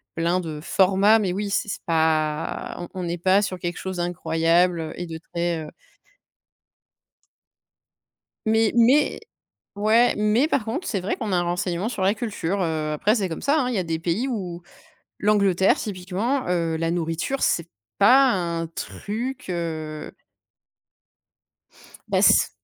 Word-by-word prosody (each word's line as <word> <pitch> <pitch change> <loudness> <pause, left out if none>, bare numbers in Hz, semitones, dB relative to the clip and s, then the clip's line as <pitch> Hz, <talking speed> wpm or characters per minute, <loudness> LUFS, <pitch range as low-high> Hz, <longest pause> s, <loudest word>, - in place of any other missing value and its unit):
plein 170 +2 +1
de 155 -3 -6
formats. 195 +5 +4
Mais 190 -4 -1
oui, 200 +2 -3
c'est 210 - 0
c'est - - -4
pas 160 -1 0
on 175 - -6
on - - -4
n'est 170 0 -2
pas 190 +3 +3
sur 190 -3 -3
quelque 175 0 -4
chose 190 -1 -5
d'incroyable, 175 0 +1
heu, 160 - -5
et 175 - -4
de 160 0 -6
très, 170 0 -3
heu - - -9 2.8
Mais 220 0 +3
mais 245 +5 +4 0.6
ouais, 220 +4 +4
mais 215 +8 +2
par 260 - 0
contre, 300 - -3
c'est 200 - -1
vrai 185 +4 -2
qu'on 220 -6 -4
a - - +3
un 175 - +2
renseignement 175 +2 -2
sur 220 -5 -4
la 195 +2 +3
culture, 200 -4 -3
heu. 155 -2 -1
Après, 200 +8 +2
c'est 200 -6 -1
comme 165 - -6
ça, 290 +3 +2
hein. 250 - 0
Il 250 - -2
y - - 0
a 185 - +1
des 165 -1 -2
pays 175 +10 -1
où 180 -8 -4 0.6
l'Angleterre, 200 -3 +3
typiquement, 205 +7 -2
heu, 165 -2 0
la 165 0 -1
nourriture, 170 +10 -2
c'est 170 -1 +1 0.3
pas 255 +6 +6
un 170 -3 -2
truc, 225 +9 -5
heu 155 -3 -4 2.0
Bah, - - +1
s - - +5
185 Hz, 160 wpm, -23 LUFS, 170-215 Hz, 2.8 s, pas